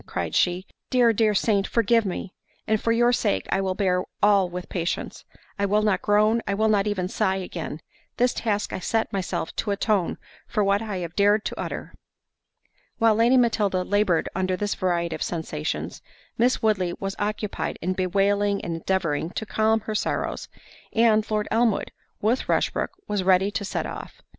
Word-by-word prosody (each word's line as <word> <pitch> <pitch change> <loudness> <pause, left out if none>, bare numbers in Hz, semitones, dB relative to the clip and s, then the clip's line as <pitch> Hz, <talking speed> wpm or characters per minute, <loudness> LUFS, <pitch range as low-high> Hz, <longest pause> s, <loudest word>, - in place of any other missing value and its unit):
cried - - -3
she; 180 +1 +1 0.2
"Dear, 245 -2 +4
dear 215 -1 +2
saint, 200 -1 +2
forgive 230 -1 +2
me; 185 0 -5 0.3
and 220 -1 +1
for 230 - +1
your 240 +1 +3
sake 95 - 0
I 195 - +2
will 190 -1 -1
bear 185 -2 +1 0.2
all 200 -3 +5
with 180 0 -6
patience—I 185 +3 -4
will 210 +2 +2
not 210 -3 +2
groan, 215 +2 +3
I 200 - 0
will 220 +2 +2
not 205 -1 +2
even 190 -3 -1
sigh 190 0 0
again—this 180 +6 -4
task 210 -3 -1
I - - -3
set 225 +4 -1
myself 190 -3 -3
to - - -1
atone 200 -2 0 0.3
for 210 - 0
what 200 +1 +2
I 215 -4 -4
have 165 - -10
dared 205 +1 +3
to - - -4
utter." - - -5 1.0
While 225 -1 +4
Lady 235 +4 +4
Matilda 210 -6 +2
laboured 205 -4 +1
under 185 0 -1
this 205 +2 -1
variety 170 -2 -1
of - - -6
sensations, 160 -2 -3 0.3
Miss 245 +1 +1
Woodley 185 -5 +1
was 195 0 -3
occupied 210 0 -2
in 185 +3 -1
bewailing 200 +2 +1
and 165 -1 -3
endeavouring 165 -3 -1
to 220 - -5
calm 220 +1 +1
her 215 - -5
sorrows—and 220 +1 -1
Lord 215 -1 0
Elmwood, 225 -1 +1 0.3
with 225 +5 0
Rushbrook, - - +1 0.2
was 205 -2 0
ready 190 +2 +3
to 205 - -3
set 200 - -3
off. - - -8
205 Hz, 170 wpm, -25 LUFS, 185-220 Hz, 1.0 s, all